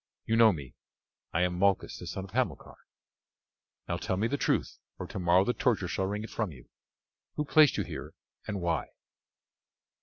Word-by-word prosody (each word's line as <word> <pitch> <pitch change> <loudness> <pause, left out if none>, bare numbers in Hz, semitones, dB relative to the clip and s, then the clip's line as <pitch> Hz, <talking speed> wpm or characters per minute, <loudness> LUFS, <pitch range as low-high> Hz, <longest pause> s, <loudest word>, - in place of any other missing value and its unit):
You 115 - +1
know 115 -1 +7
me; 70 -8 -7 0.6
I 90 - +2
am 90 0 0
Malchus 100 0 +1
the - - -8
son 95 - -4
of 95 - -10
Hamilcar. 110 - -2 1.1
Now, - - -1
tell 95 - -2
me 105 - +1
the 140 - -1
truth, - - 0 0.2
or - - -5
tomorrow 90 0 +3
the 125 - +1
torture 120 -9 +1
shall 95 +2 -1
wring 105 +2 -3
it 110 - -8
from 110 -6 -2
you. 65 -5 -14 0.7
Who 150 - -1
placed 150 -1 +5
you - - +1
here, - - -7 0.3
and 100 -3 -3
why?" 85 -2 0
100 Hz, 180 wpm, -30 LUFS, 90-115 Hz, 1.1 s, know